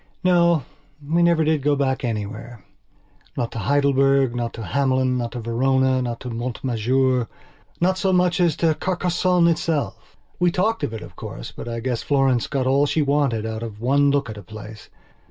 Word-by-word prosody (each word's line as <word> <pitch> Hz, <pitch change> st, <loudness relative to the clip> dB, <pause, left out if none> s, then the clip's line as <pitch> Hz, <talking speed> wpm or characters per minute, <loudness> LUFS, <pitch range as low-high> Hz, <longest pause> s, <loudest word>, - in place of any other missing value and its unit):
No, 170 Hz, -4 st, +3 dB, 0.4 s
we 165 Hz, +3 st, +2 dB
never 170 Hz, -2 st, +4 dB
did 155 Hz, -1 st, +1 dB
go 145 Hz, +1 st, +2 dB
back 135 Hz, -2 st, -1 dB
anywhere. 110 Hz, -1 st, -5 dB, 0.7 s
Not 120 Hz, -2 st, -2 dB
to 115 Hz, -, -5 dB
Heidelberg, 135 Hz, +2 st, +2 dB
not 120 Hz, -1 st, -2 dB
to 115 Hz, -, -7 dB
Hamelin, 130 Hz, +3 st, +1 dB
not 120 Hz, -1 st, -4 dB
to 125 Hz, -, -4 dB
Verona, 130 Hz, +3 st, +1 dB
not 120 Hz, -2 st, -3 dB
to 125 Hz, -, -6 dB
Mont 120 Hz, +1 st, -5 dB
Majournot 125 Hz, +1 st, +1 dB, 0.7 s
so 190 Hz, 0 st, 0 dB
much 180 Hz, -1 st, +2 dB
as 170 Hz, -4 st, +3 dB
to 165 Hz, -2 st, +2 dB
Carcassonne 180 Hz, 0 st, +1 dB
itself. 160 Hz, -2 st, -2 dB, 0.2 s
We 180 Hz, 0 st, +4 dB
talked 215 Hz, +6 st, 0 dB
of 115 Hz, -, -2 dB
it, 110 Hz, -, -7 dB
of -, -, -12 dB
course, -, -, -8 dB
but -, -, -9 dB
I 115 Hz, 0 st, -4 dB
guess 125 Hz, -1 st, -2 dB
Florence 135 Hz, -4 st, +1 dB
got 135 Hz, -3 st, -1 dB
all 140 Hz, +2 st, +3 dB
she 155 Hz, +1 st, +1 dB
wanted 140 Hz, -6 st, +1 dB
out 110 Hz, 0 st, -4 dB
of 110 Hz, -3 st, -7 dB
one 140 Hz, +4 st, +3 dB
look 140 Hz, -1 st, +1 dB
at 110 Hz, -2 st, -7 dB
a -, -, -9 dB
place. 110 Hz, +2 st, -11 dB
130 Hz, 185 wpm, -22 LUFS, 115-155 Hz, 0.7 s, never